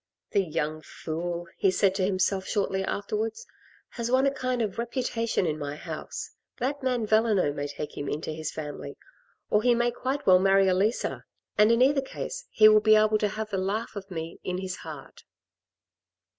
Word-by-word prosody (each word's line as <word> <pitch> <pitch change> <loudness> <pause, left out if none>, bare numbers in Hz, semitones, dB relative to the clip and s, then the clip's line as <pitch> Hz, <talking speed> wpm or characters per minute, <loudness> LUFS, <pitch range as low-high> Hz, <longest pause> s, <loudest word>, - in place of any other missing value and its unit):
"The 200 - +3
young 155 -2 -2
fool," 170 +2 -5
he 195 - +4
said 190 0 +3
to 190 -1 -1
himself 190 0 +1
shortly 195 -2 0
afterwards, 215 - -3 0.4
"has 235 0 -4
won 260 +2 +4
a 275 - +3
kind 255 -3 -1
of 210 0 -4
reputation 235 -3 -1
in 155 -2 -1
my 145 0 -4
house. - - -6 0.3
That 280 +3 -2
man 250 -4 0
Valenod 215 -8 +3
may 145 0 -3
take 145 +1 -6
him 145 - -4
into 155 +1 -3
his 155 0 -4
family, 150 -2 -7 0.5
or 210 - +4
he 240 +1 +4
may 240 +1 +2
quite 265 +4 -3
well 185 -1 +7
marry 195 0 +4
Elisa, 195 +5 0 0.3
and 210 +2 +5
in 230 +2 +5
either 275 +1 +4
case, - - -6
he 215 - +6
will 215 0 +7
be 215 0 +6
able 215 0 +4
to 210 - +2
have 215 +1 -5
the 195 - 0
laugh 210 +5 -2
of 200 -1 -7
me 165 -2 -6
in 180 0 -2
his 185 -1 -4
heart." 155 -4 -10
200 Hz, 185 wpm, -27 LUFS, 180-230 Hz, 0.5 s, well